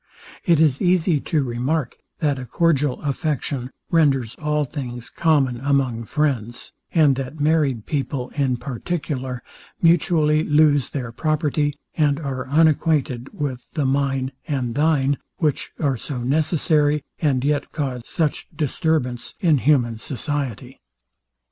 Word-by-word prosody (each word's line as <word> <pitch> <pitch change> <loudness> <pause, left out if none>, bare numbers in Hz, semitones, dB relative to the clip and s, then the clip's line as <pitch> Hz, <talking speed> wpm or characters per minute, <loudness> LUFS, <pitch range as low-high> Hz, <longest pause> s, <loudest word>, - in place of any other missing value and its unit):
It 170 -4 +4
is 150 -4 +3
easy 175 -3 +3
to 150 +1 0
remark, 125 +3 -1 0.3
that 145 -4 +1
a 130 - -6
cordial 150 -5 +1
affection 140 -3 -2 0.2
renders 135 -8 +3
all 150 -1 +1
things 125 -4 -6
common 140 -7 +2
among 135 -5 0
friends; 120 -5 -2 0.2
and 150 -5 +4
that 135 +3 -5
married 145 -7 +1
people 135 -3 -2
in 135 -4 0
particular 130 -1 -4 0.4
mutually 160 -2 +3
lose 150 -3 +3
their 125 -5 -4
property, 150 +1 0 0.2
and 145 -2 +2
are 135 -4 -4
unacquainted 145 -4 +2
with 130 -4 -4
the 150 -4 0
mine 135 -1 0 0.2
and 130 -5 -1
thine, 145 -1 +2 0.2
which 150 -4 -1
are 140 -5 +1
so 125 +1 -5
necessary, 150 +1 +2 0.2
and 135 -5 +1
yet 145 0 0
cause 135 -5 -3
such 155 -3 -1
disturbance 150 -5 -1
in 165 -8 +3
human 120 -5 +2
society. 130 0 -4
145 Hz, 125 wpm, -22 LUFS, 130-155 Hz, 0.4 s, It